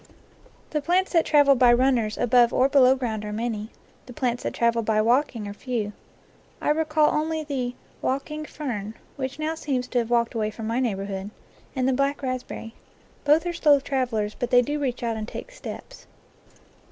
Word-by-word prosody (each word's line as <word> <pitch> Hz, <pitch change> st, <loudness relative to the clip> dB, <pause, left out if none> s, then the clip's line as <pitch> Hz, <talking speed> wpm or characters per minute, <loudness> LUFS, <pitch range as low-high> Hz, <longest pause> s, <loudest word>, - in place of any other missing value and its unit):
The 300 Hz, -, 0 dB
plants 365 Hz, +6 st, +1 dB
that 330 Hz, -2 st, +3 dB
travel 290 Hz, -2 st, +6 dB
by 250 Hz, -2 st, +5 dB
runners 240 Hz, -3 st, +2 dB
above 245 Hz, 0 st, +4 dB
or 255 Hz, -, +3 dB
below 265 Hz, -2 st, +5 dB
ground 225 Hz, -5 st, -3 dB
are 210 Hz, -, -5 dB
many; 220 Hz, -1 st, -3 dB, 0.4 s
the 250 Hz, -, -9 dB
plants 245 Hz, -1 st, -1 dB
that -, -, -4 dB
travel 235 Hz, 0 st, +2 dB
by 220 Hz, -1 st, +1 dB
walking 235 Hz, -1 st, +1 dB
are 200 Hz, -, -6 dB
few. 215 Hz, -2 st, -3 dB, 0.7 s
I -, -, +1 dB
recall 310 Hz, 0 st, +2 dB
only 315 Hz, +1 st, -1 dB
the 255 Hz, -4 st, -3 dB, 0.3 s
"walking 300 Hz, +3 st, -2 dB
fern," 230 Hz, -9 st, -5 dB, 0.2 s
which 265 Hz, -1 st, -4 dB
now 310 Hz, +1 st, -1 dB
seems 265 Hz, -6 st, -2 dB
to 245 Hz, -, +1 dB
have 230 Hz, -1 st, -2 dB
walked 235 Hz, -1 st, +2 dB
away 215 Hz, -2 st, -1 dB
from 215 Hz, +1 st, -7 dB
my 230 Hz, +3 st, 0 dB
neighbor 200 Hz, -6 st, -1 dB
hood, 195 Hz, 0 st, -5 dB, 0.5 s
and 260 Hz, -1 st, +1 dB
the 265 Hz, -, +3 dB
black 275 Hz, +2 st, 0 dB
raspberry. 255 Hz, -3 st, -4 dB, 0.5 s
Both 300 Hz, +4 st, +4 dB
are 350 Hz, -, -1 dB
slow 295 Hz, -4 st, +4 dB
travel 260 Hz, -4 st, -1 dB
ers, 210 Hz, 0 st, -1 dB
but 245 Hz, -, -3 dB
they 245 Hz, 0 st, +5 dB
do 295 Hz, +4 st, -2 dB
reach 255 Hz, -4 st, -2 dB
out 230 Hz, -1 st, -1 dB
and 215 Hz, 0 st, -5 dB
take -, -, -8 dB
steps. -, -, -9 dB
250 Hz, 190 wpm, -25 LUFS, 230-290 Hz, 0.7 s, travel